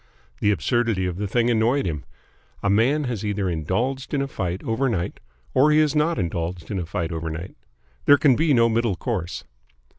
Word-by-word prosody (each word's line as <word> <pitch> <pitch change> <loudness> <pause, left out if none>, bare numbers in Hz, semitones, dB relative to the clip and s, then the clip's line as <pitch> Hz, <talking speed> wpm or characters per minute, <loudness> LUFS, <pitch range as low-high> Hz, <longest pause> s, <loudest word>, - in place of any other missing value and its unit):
The 105 - +2
absurdity 115 -1 +1
of 90 -1 -3
the 105 +1 -2
thing 120 +4 +2
annoyed 120 +5 +2
him. 75 -5 -3 0.6
A 100 - +2
man 130 +9 +3
has 120 -6 -3
either 105 -2 -1
indulged 115 - -2
in 140 - +1
a - - -3
fight 95 -7 -4
overnight 115 -6 -1 0.3
or 135 +4 +5
he 150 - +4
has 155 -1 +3
not 150 +1 +2
indulged 85 -1 -3
in 100 - -1
a 85 - -4
fight 85 -1 -3
overnight. 80 +2 -5 0.5
There 145 - +7
can 140 -3 +4
be 160 +2 +2
no 115 -3 +5
middle 115 -3 +1
course. 90 -6 -3
110 Hz, 185 wpm, -23 LUFS, 90-130 Hz, 0.6 s, There